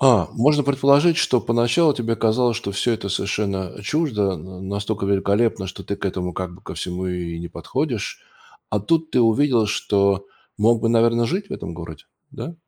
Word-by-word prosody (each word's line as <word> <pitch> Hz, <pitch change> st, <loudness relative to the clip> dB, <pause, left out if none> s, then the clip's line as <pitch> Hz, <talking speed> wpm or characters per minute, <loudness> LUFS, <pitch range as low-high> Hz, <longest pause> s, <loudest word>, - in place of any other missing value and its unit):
А, 120 Hz, -, +5 dB
можно 145 Hz, +5 st, +3 dB
предположить, 140 Hz, +4 st, +4 dB
что 125 Hz, -, +2 dB
поначалу 120 Hz, +8 st, +3 dB
тебе 115 Hz, -3 st, -1 dB
казалось, 115 Hz, +1 st, +1 dB
что 100 Hz, -, -4 dB
всё 100 Hz, +5 st, +1 dB
это 105 Hz, -3 st, -3 dB
совершенно, 100 Hz, -1 st, -1 dB
а, 100 Hz, -, -12 dB
чуждо, 105 Hz, -, 0 dB
на 90 Hz, +3 st, -10 dB
настолько 100 Hz, +1 st, -3 dB
великолепно, 100 Hz, +1 st, +1 dB
что 95 Hz, -, -8 dB
ты 100 Hz, -, -4 dB
к -, -, -8 dB
этому 90 Hz, -1 st, -3 dB
как 90 Hz, 0 st, -5 dB
бы 90 Hz, -, -16 dB
ко -, -, -8 dB
всему 90 Hz, +1 st, -4 dB
и 85 Hz, -2 st, -4 dB
не 85 Hz, -, -6 dB
подходишь. -, -, -3 dB, 0.5 s
А 105 Hz, -, +1 dB
тут 160 Hz, +9 st, 0 dB
ты 125 Hz, -, +2 dB
увидел, 120 Hz, 0 st, +3 dB
что 100 Hz, -1 st, +1 dB, 0.3 s
мог 115 Hz, +2 st, +3 dB
бы, 115 Hz, -, +1 dB
наверно, 115 Hz, 0 st, +3 dB
жить 195 Hz, -, -2 dB
в -, -, -9 dB
этом 85 Hz, -, -6 dB
городе, 80 Hz, -2 st, -9 dB, 0.3 s
да? 170 Hz, -, -7 dB
110 Hz, 190 wpm, -22 LUFS, 95-125 Hz, 0.5 s, А